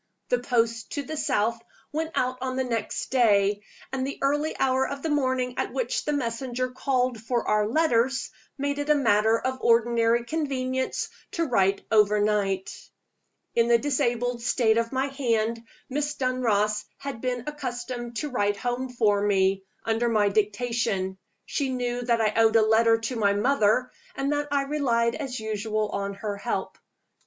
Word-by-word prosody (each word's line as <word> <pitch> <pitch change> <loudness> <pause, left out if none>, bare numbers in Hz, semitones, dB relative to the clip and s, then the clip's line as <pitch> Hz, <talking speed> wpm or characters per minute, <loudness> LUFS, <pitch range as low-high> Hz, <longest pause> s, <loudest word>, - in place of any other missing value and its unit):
The - - +2
post 230 -3 0
to 285 - -2
the 310 +2 -5
south 230 -5 0 0.3
went 320 +2 -3
out 255 0 0
on 260 0 -2
the 260 - 0
next 230 -3 -3
day; 205 -5 +3 0.3
and 260 -1 -1
the 280 - -5
early 295 +3 0
hour 265 0 +2
of 280 0 -6
the 320 - -1
morning 260 -3 0
at - - -1
which - - -1
the 300 - 0
messenger 255 -1 -2
called 255 -3 0
for 235 +1 -1
our 210 0 +2
letters 265 -1 +1 0.3
made 285 +1 -1
it 290 +1 -3
a 300 - +6
matter 220 -5 +3
of 260 +2 -3
ordinary 235 0 +3
convenience 260 -3 -2 0.2
to 335 - 0
write 195 -7 +1
overnight. 210 -2 +2 0.8
In 235 0 +3
the 235 0 +5
disabled 245 -2 0
state 230 -2 +2
of 230 0 -2
my 265 0 0
hand, 230 -4 -1 0.2
Miss 295 +2 -2
Dunross 215 -6 +1
had 275 -5 -6
been 250 -2 -2
accustomed 245 -4 -5
to 300 - -2
write 205 -4 +1
home 245 +4 -2
for 215 -5 +2
me, 195 -1 +2 0.2
under 225 +1 +1
my 210 -3 +3
dictation: 205 -2 -1 0.3
she 280 -3 -1
knew 245 -1 -2
that 235 -1 +1
I 215 -1 +2
owed 225 0 +4
a 225 - +6
letter 225 +1 +4
to 225 +3 -3
my 200 -3 +2
mother, 240 +2 +2 0.2
and 275 +1 -1
that 290 0 0
I 280 -1 +1
relied 245 -5 +1
as 260 -4 -4
usual 215 0 -2
on 200 0 -3
her 205 -1 -4
help. 200 - -3
240 Hz, 165 wpm, -26 LUFS, 220-265 Hz, 0.8 s, a